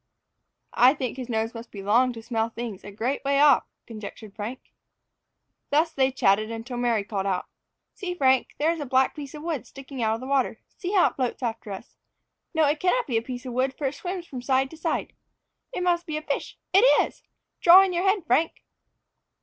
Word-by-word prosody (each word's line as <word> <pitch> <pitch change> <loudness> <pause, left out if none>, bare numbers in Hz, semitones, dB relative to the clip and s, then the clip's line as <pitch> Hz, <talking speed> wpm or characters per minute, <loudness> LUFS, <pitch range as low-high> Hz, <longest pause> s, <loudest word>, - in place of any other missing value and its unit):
"I 255 +4 +6
think 255 -4 -3
his 255 -1 -6
nose 225 0 -1
must 230 0 -9
be 200 -2 -8
long 240 +6 +3
to 225 -1 -9
smell 225 -1 -1
things 230 -4 -6
a 200 - -8
great 230 +7 -2
way 280 0 +2
off," 290 0 +6 0.2
conjectured 215 -1 -9
Frank. 225 +4 -7 1.0
Thus 315 +3 +2
they 265 -1 +2
chatted 215 -3 +2
until 230 +2 -6
Mary 235 -4 +1
called 200 -1 -3
out, 185 -2 -1 0.5
"See, 360 -3 -5
Frank, 265 -5 +2
there 310 +3 +2
is 335 - -4
a 290 - -3
black 260 +1 +3
piece 290 -2 -8
of 300 - -8
wood 320 -5 -3
sticking 270 -1 -8
out 220 -1 +2
of - - -7
the - - -6
water. 270 -1 0 0.2
See 370 +1 -4
how 380 - +5
it - - -26
floats 255 0 -2
after 225 -3 -3
us! 195 +4 -9 0.5
No, 320 -2 +3
it 295 +1 +1
cannot 430 +7 +2
be 240 -5 0
a - - +1
piece 250 +1 -7
of 250 - -5
wood, 260 +2 0
for 295 - -3
it 270 - 0
swims 355 +4 -5
from 260 -6 -7
side 265 +1 +1
to 320 - -11
side. 325 +1 -2 0.6
It 360 - -3
must 350 -1 +1
be 310 -1 -2
a 310 - -5
fish. 285 -2 -3 0.2
It 390 - +7 0.2
is! - - -13 0.4
Draw 365 +2 +9
in 380 -2 -1
your 345 - 0
head, 390 -2 +2
Frank." 305 +7 +1
260 Hz, 215 wpm, -25 LUFS, 230-310 Hz, 1.0 s, Draw